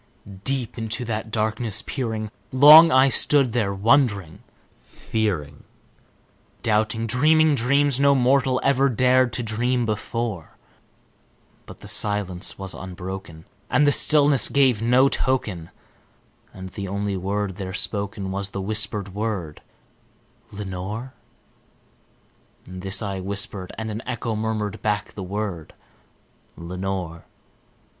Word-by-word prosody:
Deep 130 Hz, -3 st, -2 dB
into 115 Hz, +2 st, -4 dB
that 110 Hz, -1 st, -4 dB
darkness 110 Hz, 0 st, -2 dB
peering, 110 Hz, -5 st, -4 dB, 0.2 s
long 150 Hz, +5 st, +9 dB
I 130 Hz, +1 st, +5 dB
stood 135 Hz, -2 st, +3 dB
there 110 Hz, -5 st, 0 dB
wondering, 100 Hz, -, +1 dB, 0.4 s
fearing, 85 Hz, -11 st, -4 dB, 1.0 s
Doubting, 110 Hz, +1 st, 0 dB
dreaming 155 Hz, +7 st, +3 dB
dreams 140 Hz, +1 st, +2 dB
no 140 Hz, 0 st, +4 dB
mortal 130 Hz, 0 st, +2 dB
ever 140 Hz, 0 st, +3 dB
dared 130 Hz, +1 st, +3 dB
to 120 Hz, -, -3 dB
dream 120 Hz, +3 st, -1 dB
before; 110 Hz, -3 st, -4 dB, 1.1 s
But -, -, -13 dB
the -, -, -11 dB
silence 100 Hz, -4 st, -1 dB
was 95 Hz, -1 st, -7 dB
unbroken, 95 Hz, -3 st, -8 dB, 0.2 s
and 145 Hz, -, +3 dB
the 145 Hz, -, +6 dB
darkness 145 Hz, -3 st, +4 dB
gave 130 Hz, -6 st, +2 dB
no 125 Hz, +3 st, +4 dB
token, 105 Hz, -12 st, -2 dB, 0.8 s
And 95 Hz, 0 st, -9 dB
the 100 Hz, +1 st, -6 dB
only 100 Hz, +1 st, -3 dB
word 100 Hz, +1 st, -3 dB
there 95 Hz, -2 st, -5 dB
spoken 100 Hz, -1 st, -3 dB
was 100 Hz, +1 st, -2 dB
the 100 Hz, -, -6 dB
whispered 105 Hz, -1 st, -1 dB
word, 100 Hz, -7 st, -4 dB, 0.9 s
"Lenore!" 105 Hz, +5 st, -6 dB, 1.5 s
This 95 Hz, +3 st, -2 dB
I 100 Hz, -2 st, -4 dB
whispered, 100 Hz, -1 st, -4 dB
and 110 Hz, -1 st, -4 dB
an 110 Hz, +2 st, -5 dB
echo 120 Hz, -2 st, -3 dB
murmured 105 Hz, -2 st, -3 dB
back 105 Hz, -1 st, -2 dB
the 100 Hz, -, -8 dB
word, 95 Hz, -3 st, -5 dB, 0.8 s
"Lenore!" 90 Hz, -1 st, -5 dB
110 Hz, 115 wpm, -23 LUFS, 95-125 Hz, 1.5 s, long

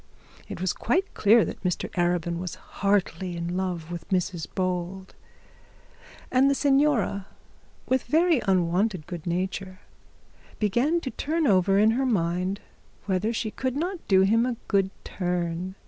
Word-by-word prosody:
It -, -, -6 dB
was 185 Hz, 0 st, 0 dB
quite 365 Hz, -, 0 dB
clear 215 Hz, +2 st, +5 dB
that -, -, -7 dB
Mr 180 Hz, -2 st, -1 dB
Arabin 175 Hz, -1 st, 0 dB
was 180 Hz, -1 st, -5 dB
heartily 190 Hz, -3 st, -1 dB
in 170 Hz, +1 st, -3 dB
love 180 Hz, -3 st, -3 dB
with 175 Hz, +1 st, -7 dB
Mrs 180 Hz, -3 st, -1 dB
Bold, 185 Hz, +1 st, -3 dB, 1.2 s
and 260 Hz, +2 st, +4 dB
the 280 Hz, -, +2 dB
signora, 270 Hz, -9 st, +2 dB, 0.6 s
with 260 Hz, 0 st, +1 dB
very 320 Hz, 0 st, +3 dB
unwonted 185 Hz, -1 st, +1 dB
good 175 Hz, -1 st, -7 dB
nature, 185 Hz, +2 st, -3 dB, 0.8 s
began 245 Hz, -, +1 dB
to 260 Hz, -, -4 dB
turn 320 Hz, +2 st, -1 dB
it 255 Hz, -, +4 dB
over 195 Hz, +1 st, +3 dB
in 215 Hz, +2 st, +5 dB
her 260 Hz, +4 st, 0 dB
mind 185 Hz, -2 st, 0 dB, 0.4 s
whether 195 Hz, +3 st, 0 dB
she 225 Hz, -1 st, -2 dB
could 260 Hz, +2 st, -3 dB
not 350 Hz, +5 st, -2 dB
do 190 Hz, -1 st, +5 dB
him 220 Hz, +4 st, +4 dB
a 250 Hz, -1 st, -1 dB
good 195 Hz, -2 st, +2 dB
turn. 180 Hz, 0 st, -3 dB
190 Hz, 145 wpm, -26 LUFS, 180-240 Hz, 1.2 s, clear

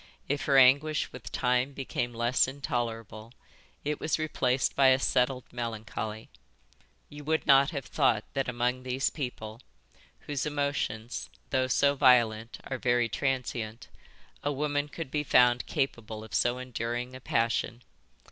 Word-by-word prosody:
If 145 Hz, +1 st, -1 dB
her 140 Hz, -2 st, +4 dB
anguish 140 Hz, +4 st, +4 dB
with -, -, -9 dB
time 125 Hz, +2 st, +1 dB
became 125 Hz, -2 st, -3 dB
less 120 Hz, +3 st, +2 dB
intolerable 115 Hz, -5 st, -4 dB, 0.5 s
it 150 Hz, 0 st, -2 dB
was 155 Hz, -, 0 dB
replaced 135 Hz, -5 st, 0 dB
by 135 Hz, -1 st, +5 dB
a 130 Hz, 0 st, +6 dB
settled 130 Hz, -1 st, +1 dB
melancholy. 110 Hz, -2 st, -5 dB, 0.8 s
You 145 Hz, 0 st, -10 dB
would 160 Hz, +1 st, 0 dB
not 140 Hz, 0 st, +6 dB
have 140 Hz, -5 st, -5 dB
thought 110 Hz, -2 st, +2 dB
that 135 Hz, -2 st, -1 dB
among 125 Hz, +1 st, -1 dB
these 130 Hz, +1 st, -1 dB
people, 120 Hz, -5 st, -6 dB, 0.6 s
whose 145 Hz, -3 st, -3 dB
emotions, 140 Hz, -6 st, -2 dB, 0.2 s
though 130 Hz, -1 st, +2 dB
so 140 Hz, +2 st, +3 dB
violent, 120 Hz, -5 st, +3 dB
are 135 Hz, -1 st, -5 dB
very 120 Hz, -1 st, +2 dB
transient, 120 Hz, -3 st, -3 dB, 0.5 s
a 145 Hz, -, -1 dB
woman 145 Hz, +1 st, -1 dB
could 150 Hz, -2 st, -7 dB
be 150 Hz, -1 st, 0 dB
found 125 Hz, -3 st, +4 dB
capable 110 Hz, -5 st, -3 dB
of 110 Hz, -, -12 dB
so 120 Hz, +1 st, +2 dB
enduring 125 Hz, 0 st, -4 dB
a -, -, -8 dB
passion. 115 Hz, +1 st, -1 dB
125 Hz, 140 wpm, -29 LUFS, 120-140 Hz, 0.8 s, a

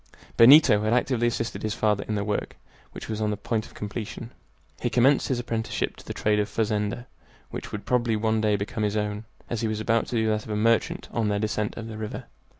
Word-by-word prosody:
Benito 115 Hz, -3 st, +8 dB
had 110 Hz, +2 st, +1 dB
actively 125 Hz, -1 st, +2 dB
assisted 115 Hz, 0 st, -2 dB
his 110 Hz, -1 st, -2 dB
father 105 Hz, -2 st, +1 dB
in 110 Hz, -, -1 dB
the 100 Hz, -, -1 dB
work, 105 Hz, 0 st, -3 dB, 0.3 s
which -, -, -8 dB
was 110 Hz, -1 st, -3 dB
on 105 Hz, -, +1 dB
the 105 Hz, -, -2 dB
point 110 Hz, 0 st, -2 dB
of -, -, -19 dB
completion. 105 Hz, +2 st, -6 dB, 0.5 s
He -, -, 0 dB
commenced 130 Hz, +3 st, +3 dB
his 130 Hz, -, 0 dB
apprenticeship 115 Hz, -2 st, -2 dB
to -, -, -14 dB
the -, -, -4 dB
trade 105 Hz, 0 st, +1 dB
of 105 Hz, -, +1 dB
a -, -, -17 dB
fazender, 105 Hz, +1 st, -1 dB, 0.5 s
which -, -, -6 dB
would 105 Hz, -, -6 dB
probably 120 Hz, -2 st, +1 dB
one 110 Hz, 0 st, +1 dB
day 105 Hz, -1 st, +2 dB
become 100 Hz, +2 st, -3 dB
his 105 Hz, 0 st, 0 dB
own, 105 Hz, +1 st, -2 dB, 0.2 s
as 120 Hz, -, -3 dB
he 115 Hz, -, 0 dB
was 110 Hz, -1 st, -2 dB
about 115 Hz, +1 st, +1 dB
to -, -, -4 dB
do 110 Hz, -1 st, +2 dB
that 105 Hz, 0 st, 0 dB
of -, -, -11 dB
a 105 Hz, -, -1 dB
merchant 115 Hz, +1 st, +1 dB
on 115 Hz, -2 st, 0 dB
their 105 Hz, 0 st, +1 dB
descent 105 Hz, 0 st, -2 dB
of 115 Hz, -, -5 dB
the 110 Hz, -1 st, -7 dB
river. 110 Hz, -1 st, -5 dB
110 Hz, 240 wpm, -26 LUFS, 105-115 Hz, 0.5 s, Benito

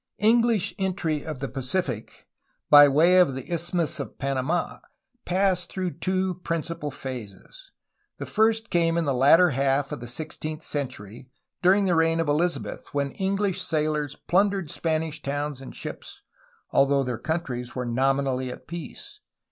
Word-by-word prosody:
English 225 Hz, -2 st, +3 dB
entry 175 Hz, -6 st, -1 dB
of 155 Hz, -3 st, -5 dB
the 135 Hz, -, -2 dB
Pacific 130 Hz, -, -3 dB, 0.5 s
by 145 Hz, 0 st, +10 dB
way 165 Hz, +6 st, +5 dB
of 165 Hz, -8 st, +4 dB
the 135 Hz, +6 st, -6 dB
Isthmus 170 Hz, -1 st, -1 dB
of -, -, -6 dB
Panamd 140 Hz, +5 st, -1 dB, 0.5 s
passed 185 Hz, -1 st, +1 dB
through 180 Hz, -4 st, -4 dB
two 185 Hz, +1 st, 0 dB
principal 165 Hz, -2 st, -3 dB
phases. 130 Hz, -, -9 dB, 0.5 s
The -, -, -5 dB
first 225 Hz, +1 st, +1 dB
came 165 Hz, -1 st, +2 dB
in 170 Hz, -, +1 dB
the 140 Hz, -, +1 dB
latter 160 Hz, +7 st, +5 dB
half 135 Hz, +1 st, +1 dB
of -, -, -4 dB
the 120 Hz, -, -8 dB
sixteenth 155 Hz, +4 st, -5 dB
century 125 Hz, -4 st, -5 dB, 0.3 s
during 195 Hz, +3 st, +4 dB
the 180 Hz, -, +2 dB
reign 165 Hz, 0 st, +2 dB
of 165 Hz, -, 0 dB
Elizabeth, 165 Hz, +4 st, -1 dB
when 140 Hz, -1 st, 0 dB
English 195 Hz, +1 st, -1 dB
sailors 150 Hz, -2 st, -1 dB
plundered 195 Hz, -3 st, +1 dB
Spanish 160 Hz, -1 st, -2 dB
towns 145 Hz, -1 st, -3 dB
and 135 Hz, -, -10 dB
ships, -, -, -8 dB, 0.5 s
although 140 Hz, 0 st, +3 dB
their 125 Hz, -3 st, -3 dB
countries 130 Hz, -6 st, -3 dB
were 125 Hz, -1 st, -2 dB
nominally 130 Hz, +1 st, 0 dB
at 125 Hz, -, -10 dB
peace. 170 Hz, -2 st, -9 dB
155 Hz, 150 wpm, -25 LUFS, 135-180 Hz, 0.5 s, by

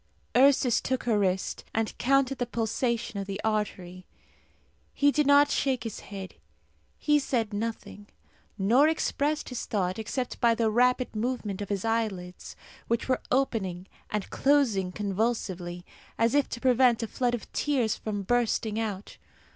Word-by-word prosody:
Ursus 260 Hz, -2 st, +4 dB
took 260 Hz, 0 st, -2 dB
her 225 Hz, -3 st, +2 dB
wrist, 190 Hz, -1 st, -1 dB
and 225 Hz, -1 st, -1 dB
counted 275 Hz, 0 st, +2 dB
the 245 Hz, -, -1 dB
pulsation 235 Hz, -1 st, -1 dB
of 195 Hz, -, -5 dB
the 195 Hz, 0 st, -4 dB
artery. 190 Hz, -4 st, -3 dB, 0.9 s
He 285 Hz, 0 st, +4 dB
did 300 Hz, -1 st, +1 dB
not 285 Hz, 0 st, +6 dB
shake 260 Hz, -4 st, 0 dB
his 225 Hz, -3 st, -5 dB
head. 195 Hz, -2 st, -8 dB, 0.6 s
He 295 Hz, -1 st, +3 dB
said 230 Hz, -6 st, -1 dB
nothing, 205 Hz, -1 st, -5 dB, 0.5 s
nor 235 Hz, +9 st, +4 dB
expressed 305 Hz, -1 st, 0 dB
his 250 Hz, -, -5 dB
thought 185 Hz, -1 st, -1 dB
except 250 Hz, +3 st, -4 dB
by 235 Hz, -1 st, +4 dB
the 225 Hz, -1 st, +1 dB
rapid 250 Hz, +1 st, +2 dB
movement 215 Hz, -4 st, -2 dB
of 200 Hz, -, -5 dB
his 200 Hz, 0 st, -2 dB
eyelids, 210 Hz, -6 st, -3 dB, 0.3 s
which 235 Hz, 0 st, -1 dB
were 255 Hz, -1 st, +1 dB
opening 200 Hz, -9 st, 0 dB, 0.2 s
and 210 Hz, -2 st, -2 dB
closing 245 Hz, -10 st, +2 dB
convulsively, 190 Hz, -4 st, -2 dB, 0.3 s
as 230 Hz, +1 st, +2 dB
if 290 Hz, -1 st, +2 dB
to 235 Hz, -, -5 dB
prevent 250 Hz, -2 st, +3 dB
a -, -, -2 dB
flood 245 Hz, +2 st, 0 dB
of 235 Hz, -, -10 dB
tears 255 Hz, -7 st, +1 dB
from 205 Hz, -2 st, -4 dB
bursting 225 Hz, -1 st, 0 dB
out. 210 Hz, -3 st, -4 dB
225 Hz, 150 wpm, -28 LUFS, 205-255 Hz, 0.9 s, not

